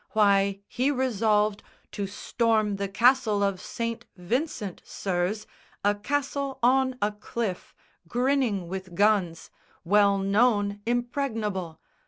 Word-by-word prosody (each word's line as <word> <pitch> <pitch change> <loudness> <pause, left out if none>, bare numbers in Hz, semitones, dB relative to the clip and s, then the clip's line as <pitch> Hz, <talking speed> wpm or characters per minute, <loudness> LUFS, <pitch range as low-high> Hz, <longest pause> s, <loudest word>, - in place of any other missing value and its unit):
Why, 200 -2 +3
he 255 +3 0
resolved 215 -6 +1 0.3
To 200 -1 -3
storm 215 0 0
the 200 0 -2
Castle 220 0 +3
of 195 -2 0
St. 230 0 -4
Vincent, 210 - -3
sirs, 190 +3 -2 0.4
A 205 - +4
castle 280 +4 -2
on 260 +1 +3
a 210 - +2
cliff, 210 -2 -5 0.3
grinning 245 -4 0
with 185 0 -6
guns, 195 -5 +1 0.3
Well 200 +2 +4
known 205 0 +2
impregnable! 225 - -2
210 Hz, 110 wpm, -26 LUFS, 195-245 Hz, 0.4 s, A